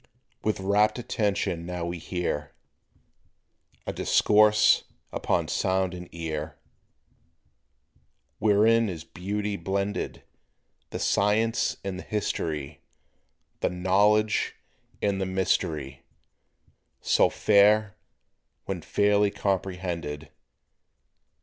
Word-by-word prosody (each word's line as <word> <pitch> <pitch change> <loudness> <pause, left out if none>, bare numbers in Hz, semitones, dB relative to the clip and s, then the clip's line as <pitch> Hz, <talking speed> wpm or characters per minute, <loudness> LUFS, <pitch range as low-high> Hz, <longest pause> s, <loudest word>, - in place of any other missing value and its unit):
With 110 -2 0
rapt 100 +4 +2
attention 100 -7 -1
now 90 0 -4
we 85 0 -4
hear 80 -4 -3 1.3
A - - -3
discourse 105 0 +4 0.3
upon - - 0
Sound 95 -1 0
and 90 -1 -8
Ear, 80 -2 -5 1.8
Wherein 110 +2 +4
is 85 -4 -6
beautifully 100 +4 -4
blended, 100 +4 -3 0.7
The - - -5
Science 110 +3 +1
and 95 -1 -4
the - - -7
History, 80 -9 -3 0.8
The - - +1
Knowledge 100 +4 +2 0.5
and 100 -1 +1
the 95 - -1
Mystery 80 -7 -1 1.0
So - - +3
fair, 105 0 +4 0.7
when 95 -3 -4
fairly 105 +3 +2
comprehended. 90 -7 -3
95 Hz, 85 wpm, -26 LUFS, 85-105 Hz, 1.8 s, discourse